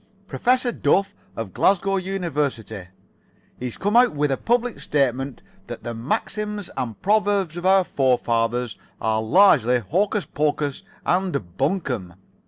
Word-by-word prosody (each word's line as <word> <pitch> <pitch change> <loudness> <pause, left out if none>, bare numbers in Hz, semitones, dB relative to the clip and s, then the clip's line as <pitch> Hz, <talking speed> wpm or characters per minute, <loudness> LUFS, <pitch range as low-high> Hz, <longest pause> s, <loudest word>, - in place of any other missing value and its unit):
Professor 250 +3 +1
Duff, 195 +2 +1 0.2
of 115 -5 -5
Glasgow 195 0 +2
University, 150 - -3 0.7
has 125 -2 -4
come 205 +3 -1
out 245 -6 +6
with 145 -1 +1
a - - +2
public 240 - 0
statement 135 -2 -1 0.2
that - - -8
the 120 - -4
maxims 205 - -3
and 120 -5 -4
proverbs 205 -4 +2
of 175 +1 -2
our 190 0 +5
forefathers 120 - 0 0.2
are 110 0 0
largely 125 - +5
hocus 190 - 0
pocus 145 -1 -1 0.2
and 175 - -1
buncombe. 130 - -2
150 Hz, 125 wpm, -23 LUFS, 120-195 Hz, 0.7 s, out